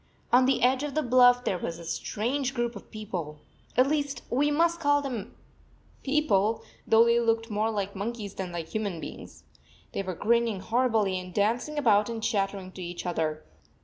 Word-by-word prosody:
On 255 +1 +6
the 270 - +2
edge 255 +1 +3
of 295 -1 -4
the 310 - +1
bluff 245 0 +5
there 180 - 0
was 165 - -4
a 170 - -10
strange 255 - -2
group 240 -1 -1
of 200 - -11
people. 185 -8 -6 0.4
At 255 - +6
least 285 0 -1
we 285 +4 +2
must 335 +3 +2
call 290 -2 +3
them 235 -7 -5 0.7
"people," 225 -7 +1 0.2
though 225 +1 +6
they 235 0 +4
looked 225 -1 0
more 215 +2 +1
like 200 -2 -3
monkeys 205 0 -4
than 185 -2 -5
like 170 -2 -5
human 205 -6 -3
beings. - - -9 0.5
They - - -2
were 185 -2 -4
grinning 230 +1 +1
horribly 220 -4 +1
and 180 0 -9
dancing 230 - 0
about 215 -6 +3
and 225 -1 -5
chattering 195 -4 -1
to 185 - -10
each 175 0 -6
other. 155 -3 -2
225 Hz, 180 wpm, -27 LUFS, 195-255 Hz, 0.7 s, On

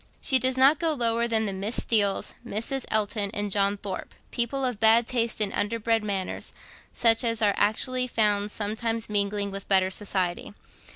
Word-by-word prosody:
She 265 - +4
does 260 0 +2
not 275 +3 +5
go 330 -2 +1
lower 235 -3 0
than 220 -1 0
the 200 - -3
Miss 200 +5 -2
Steeles, 205 -4 0
Mrs. 245 +5 -3
Elton, 210 -1 -1
and 205 0 -2
John 200 +1 +1
Thorpe, 195 -2 -7 0.2
people 260 +3 -2
of 245 -5 -3
bad 225 +1 +5
taste 235 -2 -2
and 205 -2 0
underbred 225 +1 -1
manners, 195 -3 -4 0.4
such 230 +1 +4
as 230 -2 -1
are 205 -2 +2
actually 250 +5 +1
found 210 -3 0
sometimes 220 +2 -1
mingling 200 0 -1
with 195 0 -8
better 190 -1 +2
society. 190 -1 -3
220 Hz, 170 wpm, -25 LUFS, 205-235 Hz, 0.4 s, not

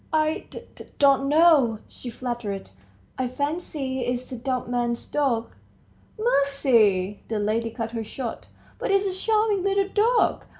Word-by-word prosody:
"I 310 0 0
d... - - -8
d... - - -12
don't 275 -1 +4
know," 300 -7 +5
she 250 - -9
faltered; 235 - -5 0.5
"I 255 - 0
fancy 285 -1 -3
it's 245 0 -2
the 255 - -7
dumb 250 0 -3
man's 240 -1 -1
dog." 250 -6 0 0.7
"Mercy!" 250 - +2
the 220 - -2
lady 220 +2 0
cut 225 0 -5
her 230 -1 -3
short; 230 +2 -6 0.3
"but - - -2
it's 395 0 +3
a 385 - -1
charming 425 +1 +1
little 395 +1 +1
dog! 455 +4 +2
260 Hz, 145 wpm, -25 LUFS, 230-320 Hz, 0.7 s, know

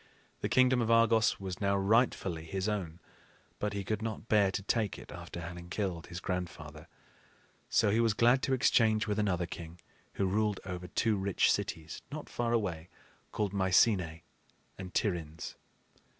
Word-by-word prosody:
The - - -2
kingdom 130 -1 +4
of 115 - 0
Argos 115 -1 +4
was 95 -1 -6
now 100 0 +2
rightfully 100 -5 +1
his 95 +4 -3
own, 90 -6 -3 0.6
but 105 0 -1
he 100 -1 -3
could 110 +3 -2
not 110 0 -5
bear 105 -3 +4
to 95 +1 -3
take 105 -1 0
it - - -11
after - - -8
having 85 +1 -8
killed 90 -4 -3
his 85 0 -6
grandfather. 90 -2 -5 0.8
So 105 -3 +3
he 110 - +2
was 115 -2 +3
glad 120 +3 +4
to 135 - 0
exchange 110 -4 +3
with 105 -1 -1
another 90 -4 +1
king 85 0 -9 0.3
who 100 - 0
ruled 105 +1 +1
over 90 -1 -5
two 110 +3 +1
rich 95 -1 +2
cities, 80 -1 -3
not 155 +1 -6
far 120 -1 -1
away, 90 -8 -1 0.4
called 105 -2 -1
Mycenae 95 -3 +2 0.5
and 95 -1 -8
Tiryns. 80 -7 -2
100 Hz, 165 wpm, -31 LUFS, 90-110 Hz, 0.8 s, kingdom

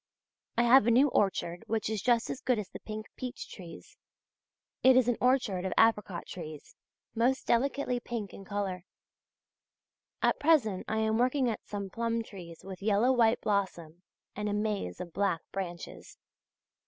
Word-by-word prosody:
I 235 - +4
have 240 -1 +6
a - - +6
new 260 +5 +5
orchard 180 -6 0
which 220 0 -1
is 215 -2 -2
just 240 0 +2
as 265 - -6
good 250 -2 +1
as 205 -3 -4
the - - -9
pink 215 0 -7
peach 255 0 -6
trees. 175 -4 -11 0.8
It 260 0 +6
is 255 -2 +4
an 245 - +2
orchard 245 -8 +2
of 190 - -2
apricot 210 -6 +2
trees, 155 -4 -9 0.4
most 250 +3 +1
delicately 250 +1 +1
pink 230 -4 -5
in 195 - -10
colour. 195 -3 -3 1.4
At - - +3
present 285 - +3
I 220 - -1
am 220 0 +1
working 255 +1 +2
at 220 - -7
some 200 -2 -5
plum 230 +1 -1
trees 175 -6 -11
with 190 -1 -8
yellow 215 +4 +3
white 235 -2 +3
blossom 175 -5 -2 0.3
and 210 0 -2
a - - -1
maze 205 - -2
of 175 -2 -7
black 195 -5 0
branches. 175 -3 -6
215 Hz, 165 wpm, -30 LUFS, 190-240 Hz, 1.4 s, have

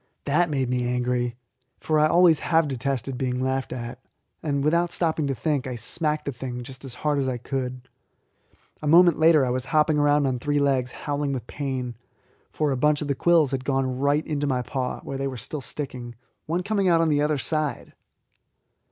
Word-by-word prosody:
That 160 +4 +2
made 135 -4 0
me 125 0 0
angry, 125 -1 -1 0.4
for 155 -1 +1
I 155 - +5
always 170 -1 +5
have 165 -2 +2
detested 135 -1 -2
being 125 -2 -1
laughed 130 +1 -1
at, 120 0 -6 0.4
and, 140 -2 -1
without 170 +3 +2
stopping 160 -3 0
to 135 - -1
think, 145 -2 -1
I 125 - -4
smacked 150 +6 -2
the 140 - -2
thing 125 -1 -6
just 130 +2 -11
as 130 -3 -8
hard 150 +1 0
as 135 - 0
I 130 -1 -1
could. 125 0 -4 0.9
A 150 - -3
moment 170 +1 +6
later 160 -3 +5
I 125 - -1
was 130 0 -2
hopping 155 -1 +2
round 145 0 +3
on 130 -2 0
three 145 +3 0
legs 135 -3 +1
howling 145 -1 -2
with 125 -4 -4
pain, 130 -3 -4 0.6
for 150 -2 -1
a 135 - 0
bunch 150 +2 +2
of 145 - -5
the - - +3
quills 160 0 +3
had 130 -1 -2
gone 130 -1 -1
right 145 +2 +2
into 145 -2 -1
my 130 -2 0
paw, 130 0 -3
where 135 -1 -6
they 135 - -1
were 130 -2 -5
still 135 +5 -6
sticking, 125 -2 -7 0.3
one 170 +3 -1
coming 200 -1 0
out 165 -1 +4
on 165 - +2
the 145 -1 +2
other 150 0 +1
side. 150 -2 -2
140 Hz, 205 wpm, -25 LUFS, 125-150 Hz, 0.9 s, moment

